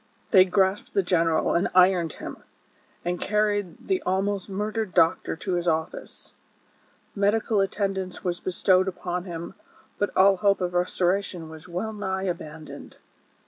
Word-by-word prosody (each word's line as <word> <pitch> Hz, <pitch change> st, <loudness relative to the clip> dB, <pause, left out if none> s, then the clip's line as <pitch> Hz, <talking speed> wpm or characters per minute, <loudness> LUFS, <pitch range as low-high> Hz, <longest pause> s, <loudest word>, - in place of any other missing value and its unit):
163 -, -, -18 dB
They 185 Hz, -, -7 dB
grasped 190 Hz, +1 st, +1 dB
the 195 Hz, -, +3 dB
general 165 Hz, -3 st, +2 dB
and 170 Hz, -, +2 dB
ironed 180 Hz, -3 st, +4 dB
him, -, -, -8 dB, 0.7 s
and 175 Hz, 0 st, -2 dB
carried 205 Hz, -4 st, -1 dB
the 380 Hz, -2 st, +1 dB
ahuost 195 Hz, +2 st, -1 dB
murdered 210 Hz, +1 st, -3 dB
doctor 165 Hz, -2 st, +3 dB
to 185 Hz, +3 st, -4 dB
his 175 Hz, 0 st, -1 dB
office. 160 Hz, 0 st, -3 dB, 0.8 s
Medical 205 Hz, +1 st, +2 dB
attend 195 Hz, 0 st, -1 dB
ance 185 Hz, -1 st, -6 dB
was 175 Hz, -1 st, -2 dB
bestowed 185 Hz, +1 st, +2 dB
upon 180 Hz, -1 st, -3 dB
him, 170 Hz, -2 st, -6 dB, 0.5 s
but 205 Hz, -, +1 dB
all 195 Hz, +1 st, +6 dB
hope 200 Hz, +1 st, +2 dB
of 180 Hz, -1 st, -2 dB
restoration 180 Hz, -1 st, 0 dB
■was 160 Hz, +1 st, -11 dB
well 185 Hz, +5 st, -4 dB
nigh 190 Hz, -2 st, -3 dB
abandoned. 160 Hz, -4 st, -6 dB
185 Hz, 145 wpm, -25 LUFS, 175-200 Hz, 0.8 s, all